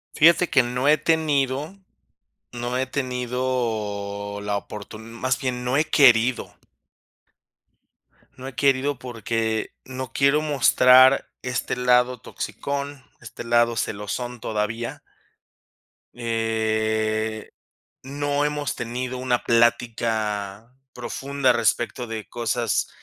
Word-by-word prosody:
Fíjate 170 +3 +5
que 135 -4 +4
no 125 +3 -2
he 150 - +6
tenido, 150 0 0 0.8
no 120 +1 -3
he 130 +1 0
tenido 115 -6 -3
la 105 0 -1
oportun 105 +2 -8
más 125 +1 -1
bien, 125 -1 -3
no 125 +2 0
he 155 - +3
querido. 125 -5 +4 1.8
No 130 +1 -9
he 135 - -9
querido 140 -1 +1
porque 115 -2 -2
no 130 -1 -6
quiero 140 +2 +3
mostrar 130 -2 +5
este 125 -1 -2
lado 125 0 +2
toxicón, 140 +3 -5 0.2
este 120 - -9
lado 120 0 +2
celosón, 115 +4 -4
todavía. 110 +2 -3 1.1
Eh, 110 -1 -1 0.5
no 145 +2 -1
hemos 150 -1 -2
tenido 125 +2 -4
una 125 -1 0
plática 115 -2 0 0.2
profunda 135 +2 0
respecto 120 +1 0
de 110 -1 -6
cosas 115 -3 -1
125 Hz, 100 wpm, -23 LUFS, 110-130 Hz, 1.8 s, he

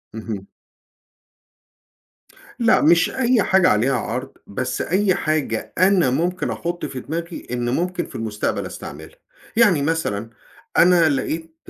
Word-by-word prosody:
اهم. 105 -3 -6 2.1
لأ 230 -2 +4
مش 165 +2 +4
أي 250 -4 +2
حاجة 190 -1 +4
عليها 125 +5 +2
عرض، 125 +3 -4
بس 125 +4 -3
أي 190 +1 +1
حاجة 150 -8 -2
أنا 185 -6 +4
ممكن 175 +7 -1
أحط 175 +1 -4
في 130 - -5
دماغي 170 +5 -6
إن 120 -1 -1
ممكن 175 +6 -1
في - - -14
المستقبل 110 -2 -2
أستعملها. - - -9 0.4
يعني 200 -11 +5
مثلًا 130 -9 -1 0.5
أنا 170 -2 +6
لقيت 160 +4 -3
160 Hz, 125 wpm, -21 LUFS, 125-180 Hz, 2.1 s, أنا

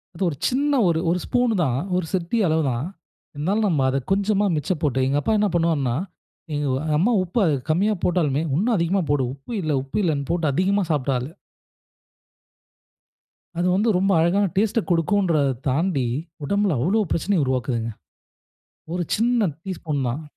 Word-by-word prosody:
அது 190 - -3
ஒரு 155 - -5
சின்ன 285 +3 0 0.2
ஒரு 165 -1 +2
ஒரு 180 - +1
ஸ்பூன் 245 -1 +1
தான், 130 -4 0 0.2
ஒரு 180 -2 0
சிட்டிக 190 +3 +1
அளவு 160 0 +1
தான், 120 +4 -2 0.5
இருந்தாலும் 195 +9 0
நம்ம 155 -8 +1
அதை 135 +1 0
கொஞ்சமா 200 +1 +2
மிச்சப் 165 +2 -2
போட்டு, 135 -4 0
எங்க 140 +2 +1
அப்பா 220 - 0
என்ன 210 - +3
பண்ணுவாருன்னா, 155 -8 +1 0.6
எங்க 145 0 -1 0.3
அம்மா 200 +10 +2
உப்பை 185 +4 0 0.3
கம்மியா 195 +7 +2
போட்டாலுமே, 155 -5 +1
இன்னும் 220 +7 +1
அதிகமா 170 +3 +1
போடு, 145 -2 +2
உப்பு 135 - -13
இல்லை 155 -3 0
உப்பு 135 - -5
இல்லைனு 145 -5 0
போட்டு 170 -2 0
அதிகமா 195 +5 +2
சாப்பிட்ட 140 -2 0
ஆளு. 125 +3 -4 2.3
அது 175 +1 +1
வந்து 215 +4 +2
ரொம்ப 195 +2 +2
அழகான 180 +5 +3
டேஸ்ட்டை 215 +2 +2
குடுக்குன்றத 165 -4 +2 0.2
தாண்டி, 140 -1 0 0.4
உடம்பில 200 +1 +1
அவ்வளோ 190 - +2
பிரச்சனைய 175 -2 +1
உருவாக்குதுங்க. 125 -3 -1 1.0
ஒரு 180 - -1
சின்ன 230 -2 +2 0.2
டீஸ்பூன் 160 -7 -3
தான். 135 +7 -3
170 Hz, 155 wpm, -23 LUFS, 145-200 Hz, 2.3 s, என்ன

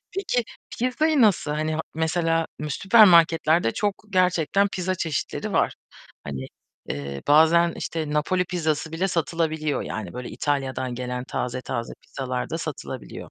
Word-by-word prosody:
Peki 330 -11 0 0.3
pizzayı 280 +4 +2
nasıl 200 -9 +3
Hani, 155 +1 -1
ha 155 - -1
mesela 165 0 +1
mü 150 0 -4
süpermarketlerde 170 - +5
çok 205 0 -2
gerçekten 185 +1 +2
pizza 185 -1 -2
çeşitleri 160 -6 -3
var. - - +2 0.5
Hani, 65 -2 -5 0.4
eee, 70 -1 -5
bazen, 165 +3 +5
işte, 160 -2 -4
Napoli 150 +5 +1
pizzası 160 -3 -2
bile 185 +4 0
satılabiliyor. 160 -2 -1
Yani 100 -4 -5
böyle 125 0 -6
İtalya'dan 130 -3 -2
gelen 125 0 -4
taze 125 -1 -3
taze 115 -2 -4
pizzalar 130 -2 -4
da 165 - -2
satılabiliyor. 145 -5 -7
160 Hz, 135 wpm, -24 LUFS, 135-180 Hz, 0.5 s, süpermarketlerde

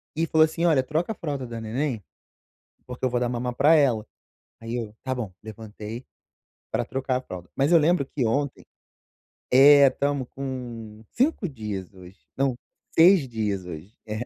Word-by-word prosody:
e 165 - +1
falou 160 -1 +5
assim: 165 +2 -2
"Olha, 150 -6 +4
troca 160 +8 -1
a 220 - -4
fralda 145 -5 -4
da 115 -1 -6
neném, 115 0 -2 0.8
porque 125 0 -10
eu - - +2
vou 120 0 0
dar 120 0 0
mamá 125 0 -3
pra 145 +6 +5
ela". 125 -8 +2 0.6
Aí 115 +1 -5
eu: 115 -3 -4
"Tá 130 - -1
bom". 115 -6 -4
Levantei 110 +2 -8 0.7
pra - - -1
trocar 130 -1 -2
a - - -1
fralda, 90 -8 -9
mas 140 +5 +2
eu 170 - +8
lembro 160 0 +2
que 135 -2 -2
ontem 140 +4 -1 0.9
é, 140 +2 +8
estamos 140 0 -1
com 120 -5 -7
5 250 - 0
dias 105 - -6
hoje 95 +1 -14 0.2
não, 135 -2 +1 0.4
6 170 -3 +6
dias 105 -5 -2
hoje. 85 +2 -9 0.2
É! 110 +3 -4
125 Hz, 175 wpm, -25 LUFS, 110-145 Hz, 0.9 s, eu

